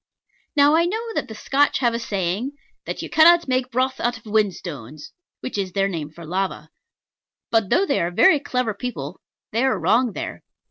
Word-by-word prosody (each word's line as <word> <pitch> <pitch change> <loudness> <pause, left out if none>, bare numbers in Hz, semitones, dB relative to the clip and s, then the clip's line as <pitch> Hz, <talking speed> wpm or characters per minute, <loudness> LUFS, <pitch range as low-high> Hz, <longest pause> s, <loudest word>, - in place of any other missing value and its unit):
Now 290 +1 +5
I 335 +1 +4
know 445 +5 -3
that - - -2
the 220 - -9
Scotch 280 +6 +2
have 240 -3 +1
a 230 - -1
saying, 200 +5 -2 0.3
"That - - -5
you - - -5
cannot 340 +1 +6
make 255 -1 0
broth 260 +1 0
out 240 +1 0
of 225 - -18
whinstones" 190 - -3 0.3
(which 255 -5 -4
is 185 -2 -3
their 195 0 +2
name 160 -6 -4
for 165 +2 -12
lava). 190 +4 -3 0.8
But, 225 -4 +2
though 390 - +3
they 280 - +1
are 170 - 0
very 300 - +5
clever 250 -5 -1
people, 190 - -6 0.3
they 230 +4 +1
are 265 -5 +2
wrong 225 +7 +2
there. - - -6
230 Hz, 190 wpm, -22 LUFS, 190-275 Hz, 0.8 s, cannot